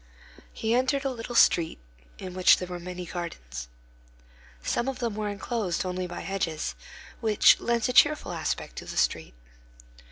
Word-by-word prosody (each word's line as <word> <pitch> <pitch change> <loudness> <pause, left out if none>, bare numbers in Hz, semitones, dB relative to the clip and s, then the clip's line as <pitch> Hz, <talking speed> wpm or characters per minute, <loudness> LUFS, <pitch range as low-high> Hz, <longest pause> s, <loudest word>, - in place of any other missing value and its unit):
He 225 +1 -1
entered 260 +3 +1
a 270 - +1
little 240 0 -6
street 170 -7 +4 0.4
in 185 -1 -7
which 185 0 +6
there 180 - -5
were 180 -1 -6
many 180 +1 -6
gardens. 65 - -6 1.0
Some 240 - 0
of 270 -2 -2
them 235 -4 -2
are 210 -1 -1
enclosed 205 -3 -2
only 180 0 -3
by 175 - -6
hedges, 165 - -2 0.5
which 215 -2 +5
lends 235 -1 0
a 250 - -1
cheerful 300 -5 +4
aspect 165 -2 -3
to - - -6
the - - -7
street. - - 0
190 Hz, 160 wpm, -27 LUFS, 175-235 Hz, 1.0 s, which